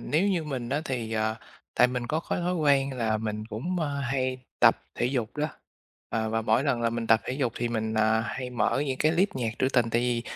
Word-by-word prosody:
nếu 170 +7 +1
như 175 -5 0
mình 130 -5 -4
á, 145 +4 0
thì, 120 -5 -3
ờ, 110 0 0 0.4
tại 125 - +6
mình 125 -1 -3
có 155 +5 0
cái - - +1
thói 180 +1 0
quen 140 -4 +3
là 110 -2 +1
mình 110 0 -4
cũng, 135 +12 -3
ơ, 145 -2 -1
hay 130 -1 -1 0.2
tập - - +5
thể 120 - 0
dục 125 -3 -2
đó. 150 +1 0 0.6
Ờ, 110 -1 -1
và 115 0 0
mỗi 110 +4 +2
lần 130 -5 +1
là 115 0 +1
mình 115 -1 -3
tập 115 -1 +5
thể - - -3
dục 130 -4 -1
thì 120 - -1
mình, 110 -1 -2
à, 110 0 +3
hay 125 +1 -4
mở 125 +4 +1
những 130 -1 -2
cái 155 +1 +3
list 190 +4 +3
nhạc 120 -4 -1
trữ 130 - +2
tình, 120 -3 +2
tại 115 - +2
vì, 120 -1 0
125 Hz, 250 wpm, -27 LUFS, 115-140 Hz, 0.6 s, tại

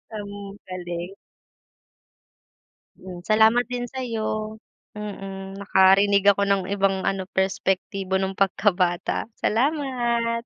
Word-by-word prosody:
Ang 205 -1 -6 0.4
galing. 175 0 -6 1.8
Hmm, 180 -1 -10
salamat 220 +3 +4
din 245 0 -4
sa’yo. 220 -4 -4 0.3
Mm, 195 -2 -7
nakarinig 200 0 +4
ako 200 0 +3
ng 195 -1 +2
ibang 195 -1 +1
ano, 195 -1 -1
perspektibo 190 0 -1
nung 190 0 -3
pagkabata. 185 -2 +1
Salamat. 240 -3 0
200 Hz, 90 wpm, -24 LUFS, 190-220 Hz, 1.8 s, salamat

